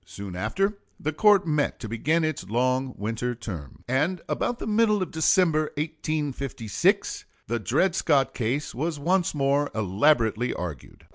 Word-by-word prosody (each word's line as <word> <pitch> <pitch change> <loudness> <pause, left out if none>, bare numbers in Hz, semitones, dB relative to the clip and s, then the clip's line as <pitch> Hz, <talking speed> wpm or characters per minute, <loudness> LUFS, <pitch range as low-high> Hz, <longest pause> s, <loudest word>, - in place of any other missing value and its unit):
Soon 95 +2 -8
after, 195 - -1 0.2
the 155 +1 -2
court 205 +3 +5
met 150 -3 0
to 115 - -6
begin 155 +10 +1
its 155 -8 -3
long 130 +3 0
winter 115 +4 -2
term; 90 - -8
and 150 +9 +1
about 245 - -1
the - - -6
middle 210 -2 +3
of - - -7
December, 160 -1 +3
1856, 145 -7 -1 0.2
the 120 +2 -2
Dred 140 - +1
Scott 140 -7 +2
case 130 +5 -2
was 155 +5 -2
once 175 +3 +1
more 140 +1 +2
elaborately 110 +3 +2
argued. 80 -8 -7
140 Hz, 145 wpm, -26 LUFS, 115-160 Hz, 0.2 s, court